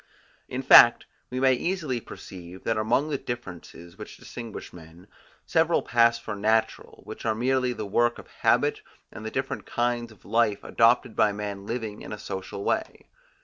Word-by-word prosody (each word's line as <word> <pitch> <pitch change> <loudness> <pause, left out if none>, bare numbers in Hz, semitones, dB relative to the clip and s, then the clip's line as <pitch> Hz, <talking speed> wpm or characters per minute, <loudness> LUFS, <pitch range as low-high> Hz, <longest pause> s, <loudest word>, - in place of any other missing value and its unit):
In 130 +1 -4
fact, 120 -2 +8 0.2
we 125 - -3
may 130 0 +4
easily 150 -3 -2
perceive 90 -2 -11
that 115 - 0
among 120 +8 +1
the 140 - -1
differences, 90 -5 -8
which 105 - -9
distinguish 115 -3 -9
men, 85 +1 -14 0.4
several 165 +1 +2
pass 115 0 +3
for 110 -2 -6
natural, 110 +2 -1
which - - -9
are 110 -1 0
merely 125 +2 +1
the 110 -3 -5
work 120 +4 +1
of - - -11
habit - - +2 0.3
and 110 - -9
the 110 - -4
different 130 +3 -4
kinds 120 -1 -1
of 110 - -20
life 110 -1 +1
adopted 115 -1 +2
by 105 - +3
men 100 -1 -6
living 115 -3 -4
in - - -9
a 105 - -5
social 95 0 -6
way. - - -2
115 Hz, 170 wpm, -26 LUFS, 105-125 Hz, 0.4 s, fact